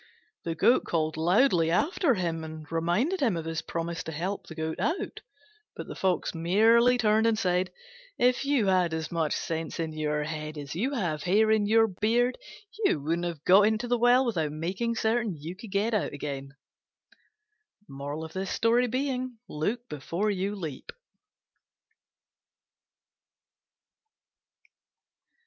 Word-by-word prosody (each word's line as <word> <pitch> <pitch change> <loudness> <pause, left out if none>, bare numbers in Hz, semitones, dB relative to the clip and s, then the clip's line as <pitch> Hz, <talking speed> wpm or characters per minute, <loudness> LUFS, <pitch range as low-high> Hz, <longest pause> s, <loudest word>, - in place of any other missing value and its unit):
The 165 -1 -2
Goat 240 +9 +4
called 155 -2 -1
loudly 175 - +3
after 295 - +2
him 165 -4 -2
and 155 -1 -8
reminded 175 - 0
him 230 -11 +1
of 165 - -5
his 165 -1 -3
promise 170 +1 -4
to 160 - -5
help 180 +6 -4
him 160 0 -3
out: 310 - -2 0.5
but - - -6
the - - -7
Fox 185 -2 0
merely 225 +9 +4
turned 220 0 +3
and 225 -1 +2
said, 180 -3 0 0.5
"If 250 +1 +2
you 275 -6 +2
had 180 -4 +2
as 160 -1 -4
much 165 -3 0
sense 165 0 -4
in 160 -1 -2
your 150 -1 -1
head 155 0 -5
as 145 -1 -6
you 245 +11 -1
have 170 - -1
hair 210 +6 +3
in 215 -2 +3
your 225 +1 +5
beard 225 +5 0 0.4
you 275 - +3
wouldn't 165 +4 -1
have 165 -4 -6
got 200 +3 +6
into 220 +2 0
the 245 0 +1
well 245 +2 +5
without 165 -11 -1
making 185 +10 -2
certain 225 -2 0
that 150 - -12
you 165 +4 -6
could 210 +3 -11
get 205 +4 0
out 210 - 0
again." 140 -1 -6 2.9
Look 225 +11 -3
before 170 +8 -2
your 200 +1 -2
leap. 160 -9 -7
180 Hz, 140 wpm, -28 LUFS, 160-225 Hz, 2.9 s, got